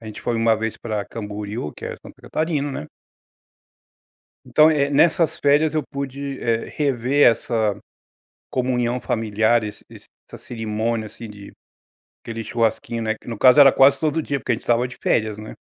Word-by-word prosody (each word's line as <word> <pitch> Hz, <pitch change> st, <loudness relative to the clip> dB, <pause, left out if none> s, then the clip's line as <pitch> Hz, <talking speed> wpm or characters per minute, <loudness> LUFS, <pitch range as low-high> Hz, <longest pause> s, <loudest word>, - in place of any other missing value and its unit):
A 115 Hz, -, -12 dB
gente 110 Hz, -, -8 dB
foi 120 Hz, -1 st, -2 dB
uma 115 Hz, 0 st, +3 dB
vez 110 Hz, 0 st, -3 dB
pra 105 Hz, -3 st, -4 dB
Camboriú, 105 Hz, -5 st, -6 dB
que -, -, -11 dB
é -, -, -4 dB
Santa -, -, -14 dB
Catarina, 155 Hz, -3 st, -2 dB
né. 75 Hz, -, -6 dB, 1.6 s
Então, 155 Hz, +1 st, +5 dB
eh, 145 Hz, -3 st, +1 dB
nessas 160 Hz, +2 st, +3 dB
férias 145 Hz, +2 st, +3 dB
eu 155 Hz, -2 st, 0 dB
pude, 140 Hz, 0 st, -6 dB
eh, 115 Hz, -1 st, 0 dB
rever 140 Hz, -1 st, +2 dB
essa 110 Hz, -3 st, -1 dB, 0.7 s
comunhão 125 Hz, -1 st, -1 dB
familiar, 110 Hz, +1 st, +1 dB
esse 105 Hz, -1 st, -8 dB
esse -, -, -14 dB, 0.2 s
essa -, -, -10 dB
cerimônia, 110 Hz, -1 st, -3 dB
assim, 115 Hz, +1 st, -10 dB
de 100 Hz, -1 st, -12 dB, 0.7 s
querer 115 Hz, -1 st, -6 dB
churrasquinho, 115 Hz, 0 st, -1 dB
né, 110 Hz, 0 st, -1 dB
que, -, -, -20 dB
no 115 Hz, -, -4 dB
caso, 130 Hz, +5 st, +6 dB
era 135 Hz, -2 st, +9 dB
quase 135 Hz, +1 st, +5 dB
todo 155 Hz, +1 st, 0 dB
dia, 140 Hz, -1 st, -2 dB
porque 130 Hz, -, -2 dB
a -, -, +2 dB
gente 115 Hz, -, -8 dB
estava 120 Hz, +1 st, +1 dB
de 125 Hz, -, -11 dB
férias, 110 Hz, -2 st, +1 dB
né? 110 Hz, 0 st, -9 dB
120 Hz, 175 wpm, -21 LUFS, 110-140 Hz, 1.6 s, era